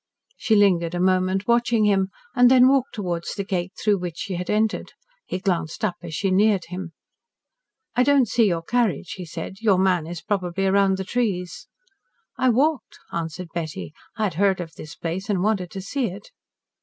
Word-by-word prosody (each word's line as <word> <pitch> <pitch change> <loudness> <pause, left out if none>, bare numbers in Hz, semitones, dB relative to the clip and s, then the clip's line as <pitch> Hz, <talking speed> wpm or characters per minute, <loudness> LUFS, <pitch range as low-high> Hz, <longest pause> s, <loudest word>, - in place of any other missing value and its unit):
She 220 - +1
lingered 180 -4 +3
a - - -2
moment 185 +2 +1
watching 235 -2 +3
him, 195 -2 +2 0.3
and 245 -1 +6
then 255 0 +7
walked 270 -1 +2
towards 175 -5 -3
the 200 - -2
gate 185 -2 -3
through 210 -3 +2
which 175 -2 -5
she 195 - -4
had 180 0 -4
entered. 215 0 0 0.3
He - - -2
glanced 185 -1 -1
up 195 - 0
as 165 -2 -6
she 195 -2 0
neared 200 0 +3
him. 180 -2 -6 1.0
"I 245 - +3
don't 275 -1 +4
see 230 +1 +3
your 170 -3 -1
carriage," 220 -4 0
he 180 - -6
said. 165 +4 -7
"Your 205 -4 +4
man 180 -4 +2
is 170 0 -7
probably 195 -2 -1
round 195 0 +3
the 190 - -3
trees." 190 -5 -2 0.7
"I 255 - +2
walked," 275 +2 +1 0.2
answered 170 +1 -4
Betty. 160 -3 -5 0.2
"I 220 - -1
had 200 -5 0
heard 190 +2 +2
of 165 -2 -6
this 155 - -10
place 180 +5 -4
and 190 -3 +1
wanted 195 -4 0
to 195 - -6
see 250 +6 -2
it." 195 - -9
190 Hz, 190 wpm, -23 LUFS, 175-215 Hz, 1.0 s, then